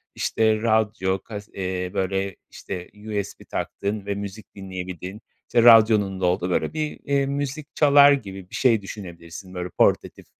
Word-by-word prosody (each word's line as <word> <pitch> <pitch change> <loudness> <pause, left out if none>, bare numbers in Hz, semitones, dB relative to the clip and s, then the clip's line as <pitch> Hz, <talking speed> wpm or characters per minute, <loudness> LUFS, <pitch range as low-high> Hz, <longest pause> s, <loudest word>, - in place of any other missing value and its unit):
işte, 110 -1 +1
radyo, 110 -4 +1
kas 105 +1 -9
eee, 90 -1 -3
böyle, 95 0 -1
işte, 90 -2 -7
USB 105 -1 -5
taktığın 100 0 -4
ve 100 0 -2
müzik 100 +1 -8
dinleyebildiğin, 95 +1 -7 0.3
işte, 120 - +3
radyonun 110 -4 +6
da - - +2
olduğu, 90 0 +1
böyle, 90 - 0
bir, 155 -1 -3
eee, 140 -1 +1
müzik 140 +2 -4
çalar 145 -1 +7
gibi 95 -9 -3
bir - - -8
şey 115 -5 +3
düşünebilirsin, 90 -2 -9
böyle, 90 -1 -4
portatif, - - +1
100 Hz, 150 wpm, -24 LUFS, 95-115 Hz, 0.3 s, çalar